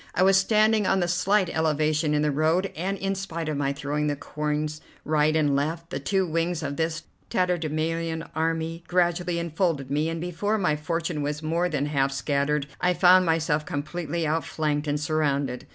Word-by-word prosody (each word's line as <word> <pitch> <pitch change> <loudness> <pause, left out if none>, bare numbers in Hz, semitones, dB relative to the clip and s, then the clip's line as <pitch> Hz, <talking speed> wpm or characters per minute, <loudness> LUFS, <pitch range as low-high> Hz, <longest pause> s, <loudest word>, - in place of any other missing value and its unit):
I 180 - +3
was 195 0 +5
standing 215 +1 +3
on 190 -2 +2
a - - 0
slight 190 +3 +2
elevation 155 -1 +1
in 150 - +2
the 150 - +2
road, 160 +6 +1
and, 190 +5 -2
in 195 +1 -1
spite 170 -4 -4
of 155 - -1
my 140 -1 0
throwing 145 +2 -2
the 145 - 0
coins 150 +1 -3 0.2
right 155 0 +2
and 145 -3 +2
left, 160 +4 -2
the - - -2
two 190 -2 +1
wings 165 0 -1
of 140 0 -3
this 160 0 -2 0.3
tatterdemalion 165 -2 -1
army 165 +1 -2
gradually 175 -1 +1
enfolded 165 -5 -1
me, 150 +3 +1
and 165 0 -3
before 180 +5 -1
my 180 -7 +1
fortune 165 +1 -2
was 150 +2 -3
more 170 +3 0
than 145 -3 -1
half 140 -2 +1
scattered 140 +1 0 0.2
I 180 0 +2
found 185 0 +6
myself 160 -2 +1
completely 160 +3 -3
outflanked 150 -1 -1
and 145 0 0
surrounded. 145 -4 -1
160 Hz, 180 wpm, -26 LUFS, 150-175 Hz, 0.3 s, found